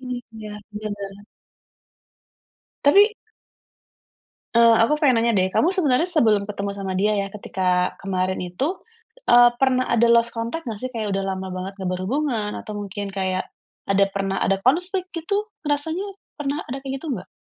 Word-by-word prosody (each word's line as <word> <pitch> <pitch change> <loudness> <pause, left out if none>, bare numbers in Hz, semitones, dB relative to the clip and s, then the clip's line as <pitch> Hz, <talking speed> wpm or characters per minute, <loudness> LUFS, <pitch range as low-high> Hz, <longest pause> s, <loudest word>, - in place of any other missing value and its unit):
Ini 250 -1 -4 0.2
dia 215 -1 -7 0.2
kejanggalan. 205 -1 -7 1.6
Tapi 405 +9 +6 1.4
eee, 230 -1 +6
aku 230 - +1
pengen 265 -5 +4
nanya 235 - +3
deh. 190 -3 +2
Kamu 335 - +2
sebenarnya 310 -6 +2
sebelum 220 - +3
ketemu 200 0 -4
sama 195 -1 -3
dia, 210 +2 +2
ya, 195 0 -2
ketika 180 -3 0
kemarin 185 -1 -1
itu, 265 - -2 0.5
eee, 240 0 +7
pernah 255 0 +2
ada 235 0 +4
lost 235 0 +3
contact 235 +6 -3
nggak 215 -3 -5
sih, 255 - -3
kayak 215 -4 -2
udah 195 0 -1
lama 190 0 -3
banget 185 +1 -5
nggak 185 -1 -2
berhubungan, 215 +3 -1
atau 215 - -8
mungkin 205 0 -5
kayak 185 -1 -1 0.4
ada 195 0 +4
pernah 195 0 -1
ada 195 0 +1
konflik, 360 - +1
gitu? 400 +6 -2 0.2
Rasanya 310 +6 -1 0.3
pernah 290 0 -2
ada 270 +2 -5
kayak 270 0 -4
gitu 320 - -7
nggak? 185 - -8
225 Hz, 160 wpm, -23 LUFS, 195-275 Hz, 1.6 s, eee